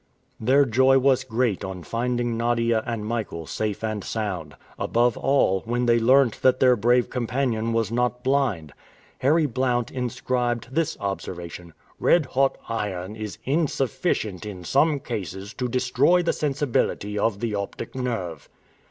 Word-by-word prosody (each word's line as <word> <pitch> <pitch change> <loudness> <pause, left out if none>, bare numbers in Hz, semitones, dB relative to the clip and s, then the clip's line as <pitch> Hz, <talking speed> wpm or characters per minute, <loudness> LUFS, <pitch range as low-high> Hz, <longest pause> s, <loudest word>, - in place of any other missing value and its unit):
Their 135 +5 +4
joy 130 +3 +4
was 135 -1 +3
great 115 -4 -1
on 95 -2 -6
finding 120 +1 -1
Nadia 115 -1 +1
and 115 -3 -3
Michael 110 -8 -3
safe 105 +5 -3
and 110 -2 -2
sound; 95 -9 -4 0.2
above 120 +1 +2
all, 135 -9 +2
when 120 +2 0
they 120 -1 +4
learnt 130 0 +4
that 130 0 +4
their 125 -1 +5
brave 120 +2 +2
companion 120 -2 -1
was 115 -2 0
not 125 +1 0
blind. 125 - 0 0.5
Harry 155 +4 +3
Blount 125 -2 0
inscribed 125 -1 -2
this 165 +1 0
observation: 90 -4 -6 0.2
"Red 170 -4 +4
hot 135 +1 +1
iron 105 -3 -3
is 110 -4 -6
insufficient 135 - -1
in 95 -4 -7
some 145 - +2
cases 100 -4 -6
to 125 - -2
destroy 130 +8 +3
the 170 - +1
sensibility 135 -7 -1
of 100 -2 0
the 115 -1 -2
optic 100 +2 -5
nerve." 100 - -4
120 Hz, 145 wpm, -24 LUFS, 105-130 Hz, 0.5 s, their